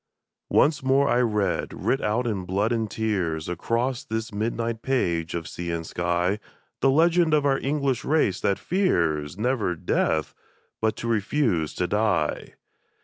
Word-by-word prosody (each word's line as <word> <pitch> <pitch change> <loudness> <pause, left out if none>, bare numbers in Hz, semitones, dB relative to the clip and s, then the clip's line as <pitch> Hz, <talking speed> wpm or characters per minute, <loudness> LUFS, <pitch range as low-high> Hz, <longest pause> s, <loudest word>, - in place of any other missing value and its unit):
Once 150 0 +3
more 135 +2 +3
I 120 - +3
read, 105 -4 0
writ 135 - 0
out 110 +4 0
in 105 -5 -2
blood 100 +5 0
and 115 -2 0
tears, 95 -8 -1
Across 115 +8 -1
this 110 0 -4
midnight 115 +2 -2
page 85 -12 0
of 85 -1 -4
sea 85 0 -5
and 85 -1 -3
sky, 90 +4 0 0.4
The 135 - +3
legend 165 +2 +4
of 145 -1 +1
our 135 -1 +2
English 135 -3 -1
race 140 - +1
that 100 - +1
fears, 85 - 0
never 110 -5 0
death, 80 -1 0 0.5
but 110 -1 +1
to 120 - -5
refuse 105 - 0
to 90 - 0
die 100 -6 0
110 Hz, 150 wpm, -25 LUFS, 90-130 Hz, 0.5 s, legend